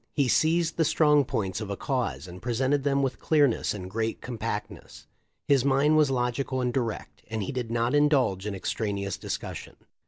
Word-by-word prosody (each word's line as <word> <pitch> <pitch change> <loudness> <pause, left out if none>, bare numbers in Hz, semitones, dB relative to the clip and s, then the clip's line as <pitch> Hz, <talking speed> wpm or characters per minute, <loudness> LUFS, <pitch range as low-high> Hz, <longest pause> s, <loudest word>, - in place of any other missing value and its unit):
He 140 -3 +2
seized 165 +4 +2
the 165 - +3
strong 150 -2 +4
points 105 -6 -2
of 105 - -5
a 100 - -3
cause 125 -7 -2
and 90 +1 -10
presented 130 +4 0
them 140 -1 +1
with 130 -2 -2
clearness 145 -6 +2
and 95 -3 -5
great 110 +3 -2
compactness. 120 -3 -6 0.4
His 140 -3 +4
mind 140 +3 +3
was 155 -2 +4
logical 130 +1 -1
and 125 -1 0
direct, 120 -5 -3
and 110 -1 -3
he - - -4
did 125 -3 -4
not 115 +1 0
indulge 135 -10 +2
in 100 - -3
extraneous 100 -1 -2
discussion. - - -6
125 Hz, 180 wpm, -27 LUFS, 110-140 Hz, 0.4 s, strong